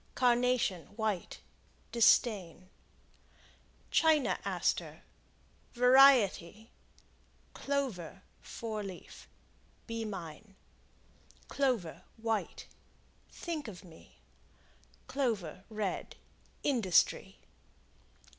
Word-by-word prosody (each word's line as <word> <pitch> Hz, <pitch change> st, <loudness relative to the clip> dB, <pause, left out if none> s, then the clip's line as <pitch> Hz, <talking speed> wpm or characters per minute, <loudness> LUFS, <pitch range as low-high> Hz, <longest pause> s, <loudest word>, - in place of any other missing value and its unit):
Carnation, 245 Hz, -7 st, +2 dB
White 215 Hz, -5 st, -3 dB, 0.5 s
Disdain. 195 Hz, -6 st, +2 dB, 1.2 s
China 315 Hz, -4 st, +3 dB
Aster -, -, -2 dB, 0.7 s
Variety. 245 Hz, -6 st, +5 dB, 0.8 s
Clover, 215 Hz, -, -3 dB, 0.2 s
Four 220 Hz, -2 st, -6 dB
Leaf 190 Hz, -3 st, -10 dB, 0.6 s
Be 230 Hz, -1 st, -4 dB
mine. 195 Hz, -1 st, -8 dB, 0.9 s
Clover, 245 Hz, -, -1 dB, 0.2 s
White 225 Hz, -1 st, -3 dB, 0.7 s
Think 320 Hz, -6 st, -5 dB
of 185 Hz, -6 st, -9 dB
me. 165 Hz, -3 st, -17 dB, 0.9 s
Clover, 200 Hz, -, -2 dB
Red 210 Hz, -3 st, -4 dB, 0.5 s
Industry. 225 Hz, -, +2 dB
220 Hz, 60 wpm, -32 LUFS, 185-250 Hz, 1.2 s, Variety